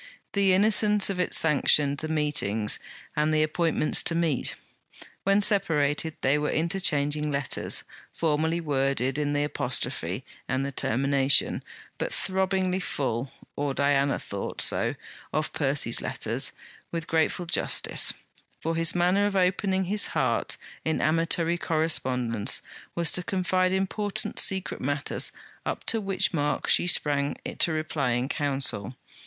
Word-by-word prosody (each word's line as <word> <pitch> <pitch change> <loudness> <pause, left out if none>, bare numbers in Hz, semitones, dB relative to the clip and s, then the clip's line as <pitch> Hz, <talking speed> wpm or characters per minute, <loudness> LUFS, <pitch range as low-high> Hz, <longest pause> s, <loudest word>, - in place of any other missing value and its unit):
The 200 -2 +3
innocence 210 0 +3
of 185 - -5
it 180 - 0
sanctioned 145 -2 +4
the 155 - -4
meetings 135 -9 0 0.4
and 150 +1 +1
the 155 0 +3
appointments 160 0 +1
to 165 - -1
meet. 165 -5 0 0.7
When 200 +1 +3
separated 160 -7 +2
they 140 +3 +2
were 150 - -1
interchanging 150 -4 0
letters, 140 -1 0 0.3
formally 160 +1 0
worded 135 -3 0
in 145 -1 -1
the 145 0 +1
apostrophe 130 -3 -2 0.2
and 130 +1 -1
the 140 - -3
termination, 135 +2 +2 0.4
but - - -2
throbbingly 190 -1 0
full: 130 -7 -2 0.2
or 145 -1 -2
Diana 140 0 +2
thought 100 -1 -6
so - - +2 0.4
of 155 0 -2
Percy's 140 -4 0
letters, - - -2 0.4
with 165 -2 -3
grateful 165 +2 0
justice; 170 - +2 0.5
for 165 +1 -2
his 165 +1 +2
manner 180 +4 +3
of 205 - -3
opening 190 +1 +1
his 205 +3 +2
heart - - 0 0.3
in 160 - -1
amatory 165 +2 +1
correspondence 130 -9 +1 0.3
was 170 -2 +2
to 180 - +2
confide 185 0 0
important, 195 +2 -2
secret 190 -1 0
matters, 145 +2 0 0.3
up - - -4
to 225 - 0
which 195 -1 +1
mark 145 -2 -1
she - - +3
sprang 145 -4 +1 0.2
to 170 - +4
reply 155 -5 -1
in 120 +2 0
counsel. 135 -6 -2
155 Hz, 135 wpm, -26 LUFS, 140-180 Hz, 0.7 s, sanctioned